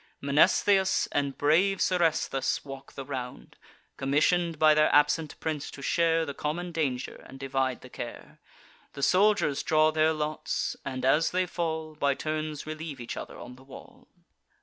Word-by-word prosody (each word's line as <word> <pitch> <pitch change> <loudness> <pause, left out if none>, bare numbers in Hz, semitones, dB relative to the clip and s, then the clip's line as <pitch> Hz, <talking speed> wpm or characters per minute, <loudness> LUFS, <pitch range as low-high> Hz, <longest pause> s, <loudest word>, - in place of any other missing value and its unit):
Mnestheus 190 +7 +3
and 140 -1 -1
brave 175 +7 +3
Seresthus 165 -8 0
walk 135 -1 -10
the 135 - -7
round, 125 -3 -7 0.4
Commission'd 160 +5 +1
by 155 0 +6
their 155 0 +4
absent 150 +2 +2
prince 155 -3 -3
to 140 - -10
share 165 +1 +2
The 140 - -5
common 170 +5 -3
danger, 140 -6 -3
and 135 - -12
divide 135 -1 -1
the 130 - -12
care. 120 - -8 0.5
The 140 - -6
soldiers 195 -6 +3
draw 155 0 +3
their 155 0 +3
lots, 155 0 -2
and, 130 -1 -4
as 150 +5 +3
they 185 0 0
fall, 160 -3 -3
By 140 -2 0
turns 155 0 -4
relieve 155 -2 -6
each 120 - -6
other - - -8
on 125 +1 -10
the 130 - -16
wall. 135 - -14
155 Hz, 155 wpm, -28 LUFS, 135-165 Hz, 0.5 s, by